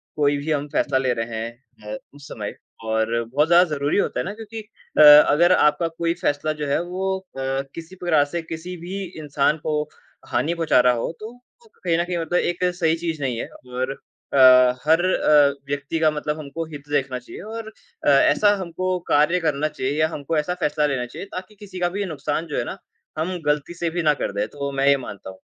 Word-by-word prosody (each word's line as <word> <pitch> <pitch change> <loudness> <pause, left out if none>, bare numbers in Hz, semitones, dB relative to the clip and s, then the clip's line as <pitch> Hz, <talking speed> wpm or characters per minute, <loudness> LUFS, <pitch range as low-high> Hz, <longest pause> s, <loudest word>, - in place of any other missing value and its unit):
कोई 145 -1 +2
भी 145 +3 -3
हम 145 -1 -1
फैसला 140 -2 +1
ले 130 -1 +1
रहे 115 -1 -4
हैं 115 -1 -8
अ, - - -4 0.2
उस 145 0 -13
समय 105 -1 -6 0.3
और 110 +1 0
बहुत 140 +7 +1
ज़्यादा 175 +1 +6
ज़रूरी 145 +1 0
होता 205 - 0
है - - -2
ना 200 - -4
क्योंकि 225 +1 -8 0.4
अ, - - +7
अगर 150 +3 +8
आपका 150 +1 +3
कोई 165 +1 -2
फैसला 150 0 0
जो 145 - -1
है, 140 +4 +1
वो 190 +2 -2
अ, 135 -7 -4
किसी 165 +3 -9
पूरा 155 -4 +4
से 170 - 0
किसी 165 +2 -7
भी 195 +1 -4 0.2
इंसान 150 0 +1
को 150 -1 +1 0.5
हानि 160 +3 0
पहुँचा 165 -6 +2
रहा 125 0 +5
हो, 115 +6 -2
तो 220 +2 -7
वो 250 - -23
तो - - -31
कहीं 170 -2 +2
न 170 - +1
कहीं 175 -1 -3
मतलब 170 +1 0
एक 175 +1 -2
सही 165 -3 +2
चीज़ 160 -3 -2
नहीं 125 -4 -1
है। - - -4 0.3
और 130 +2 -2 0.4
अ, 140 - +2 0.5
हर 160 +3 +4
अ, 150 -5 +4 0.2
व्यक्ति 145 +3 -2
का 160 - +4
मतलब 150 0 -3
हमको 155 +2 -5
हित 145 -1 -10
देखना 135 -3 -1
चाहिए 120 - -11
और 225 +1 -7 0.4
अ, - - +4
ऐसा 205 +8 +5
हमको 185 +1 -2
कार्य 150 +5 +4
करना 155 -3 0
चाहिए 135 -2 -3
या 155 - +4
हमको 155 0 -3
ऐसा 150 +4 0
फैसला 150 0 +1
लेना 130 -3 -1
चाहिए 120 - -8
ताकि 185 +3 -7
किसी 195 -2 -10
का 175 0 +1
भी 200 +2 -3
नुकसान 155 -1 -3
जो 150 - -4
है - - 0
ना, - - -6 0.4
हम 175 +4 -2
गलती 150 +2 0
से 170 -1 -2
भी 175 +2 -2
ना 150 -1 +4
कर - - -3
दें, 100 +1 -1
तो 145 - -16
वो 140 - -2
मैं 135 0 0
ये 140 - +6
मानता 105 -7 -8
हूँ। 95 0 -12
150 Hz, 225 wpm, -22 LUFS, 140-175 Hz, 0.5 s, अगर